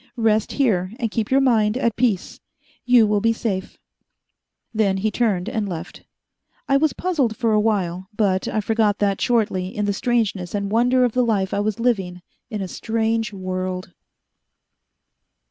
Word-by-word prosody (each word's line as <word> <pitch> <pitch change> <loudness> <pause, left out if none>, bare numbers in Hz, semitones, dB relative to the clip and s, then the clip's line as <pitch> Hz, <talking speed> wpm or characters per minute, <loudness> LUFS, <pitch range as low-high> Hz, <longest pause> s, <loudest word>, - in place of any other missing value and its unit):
Rest 220 -2 +1
here, 200 -8 +1
and 230 -4 -1
keep 220 -1 -2
your 270 +1 +4
mind 225 -4 +2
at 235 -4 0
peace. 225 -7 -1 0.5
You 245 -3 +6
will 210 -1 +1
be 230 +1 +3
safe." 195 -5 -4 1.0
Then 205 -3 +1
he 215 +3 0
turned 205 -7 0
and 210 -2 -2
left. 175 0 -7 0.6
I 275 - +3
was 300 +2 +3
puzzled 280 - -1
for 230 -3 +1
a 215 - +4
while, 190 -4 -1
but 190 -3 +1
I 215 - -1
forgot 215 -1 +1
that 200 -2 0
shortly 210 -6 +1
in 205 +2 -3
the 200 - 0
strangeness 210 -5 -1
and 200 0 -2
wonder 250 +3 +3
of 245 - 0
the 250 +2 +1
life 200 -5 0
I - - 0
was 215 +2 -1
living 190 -7 -1 0.3
in 215 -4 -4
a - - -4
strange 225 +2 -1
world.... 185 -1 -4
215 Hz, 165 wpm, -22 LUFS, 190-230 Hz, 1.0 s, You